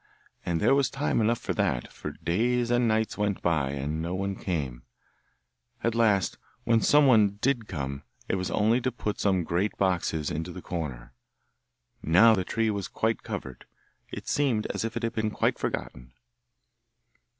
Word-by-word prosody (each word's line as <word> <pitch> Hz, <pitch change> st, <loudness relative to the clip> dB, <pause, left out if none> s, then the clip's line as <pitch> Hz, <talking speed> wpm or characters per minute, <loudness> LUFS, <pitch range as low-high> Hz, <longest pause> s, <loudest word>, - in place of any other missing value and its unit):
And 85 Hz, -2 st, -1 dB
there -, -, +4 dB
was 140 Hz, -3 st, +3 dB
time 135 Hz, -3 st, 0 dB
enough 115 Hz, +2 st, +2 dB
for -, -, -3 dB
that, 80 Hz, -, -1 dB
for -, -, -6 dB
days 120 Hz, +7 st, 0 dB
and 120 Hz, 0 st, +3 dB
nights 110 Hz, -1 st, 0 dB
went 105 Hz, -2 st, 0 dB
by, 80 Hz, -6 st, +1 dB
and 75 Hz, +3 st, -3 dB
no 85 Hz, +2 st, -3 dB
one 100 Hz, +1 st, -2 dB
came; 70 Hz, -12 st, -3 dB, 1.0 s
at 115 Hz, -, +1 dB
last 105 Hz, -5 st, +2 dB, 0.2 s
when 115 Hz, -1 st, +3 dB
some 145 Hz, 0 st, +5 dB
one 105 Hz, -6 st, +4 dB
did 120 Hz, -3 st, 0 dB
come, 70 Hz, -4 st, -4 dB, 0.3 s
it -, -, -1 dB
was 95 Hz, -1 st, -1 dB
only 110 Hz, +4 st, +2 dB
to 130 Hz, -, 0 dB
put 105 Hz, -3 st, -4 dB
some 95 Hz, -3 st, +2 dB
great 90 Hz, +6 st, -1 dB
boxes 85 Hz, -5 st, 0 dB
into 80 Hz, +4 st, -3 dB
the 90 Hz, -, -8 dB
corner. 65 Hz, -9 st, -5 dB, 0.9 s
Now 95 Hz, +8 st, +6 dB
the 95 Hz, -4 st, +1 dB
tree 115 Hz, +4 st, 0 dB
was 100 Hz, -2 st, -3 dB
quite 110 Hz, 0 st, -1 dB
covered; 65 Hz, -2 st, -7 dB, 0.5 s
it -, -, -7 dB
seemed 130 Hz, -7 st, +1 dB
as -, -, -2 dB
if 115 Hz, 0 st, -3 dB
it 120 Hz, -, -4 dB
had 115 Hz, 0 st, -1 dB
been 110 Hz, -1 st, 0 dB
quite -, -, 0 dB
forgotten. -, -, -4 dB
100 Hz, 170 wpm, -27 LUFS, 85-115 Hz, 1.0 s, Now